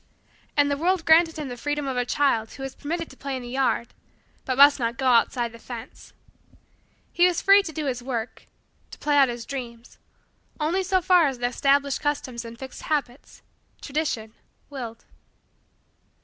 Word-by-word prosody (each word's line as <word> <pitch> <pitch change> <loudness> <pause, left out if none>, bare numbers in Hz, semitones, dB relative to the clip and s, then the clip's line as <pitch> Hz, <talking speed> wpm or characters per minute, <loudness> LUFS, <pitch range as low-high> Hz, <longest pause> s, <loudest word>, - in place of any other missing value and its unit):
And 285 0 +4
the 285 - 0
world 350 +2 0
granted 325 0 +5
him 300 -2 -4
the 245 - -5
freedom 290 +3 -3
of 265 - -2
the 245 0 -1
child 240 -7 +1
who 270 - -8
is 270 - -5
permitted 330 +3 -4
to - - -14
play 275 -1 -4
in 255 - -5
the 240 - -8
yard 255 -2 0 0.5
but 255 -1 -2
must 285 +1 +7
not 235 +1 -2
go 265 - -3
outside 240 -1 +3
the 230 - -13
fence. 240 0 -10 1.0
He 355 +1 +5
was 350 -2 0
free 395 +1 +6
to 355 - -7
do 310 -1 -4
his 250 -3 -2
work 240 -2 -5 0.4
to - - -11
play 295 -1 0
out 275 -2 +5
his 235 -1 -6
dreams 240 -3 -8 0.6
only 325 +5 0
so 375 -1 +1
far 355 -3 +5
as 265 -2 -3
the 245 - -2
established 275 +3 +1
customs 265 -5 -2
and 230 0 -10
fixed 265 +1 -9
habits 285 -4 -4 0.4
Tradition 270 -7 -3 0.4
willed. 235 -5 -7
275 Hz, 180 wpm, -25 LUFS, 245-300 Hz, 1.0 s, must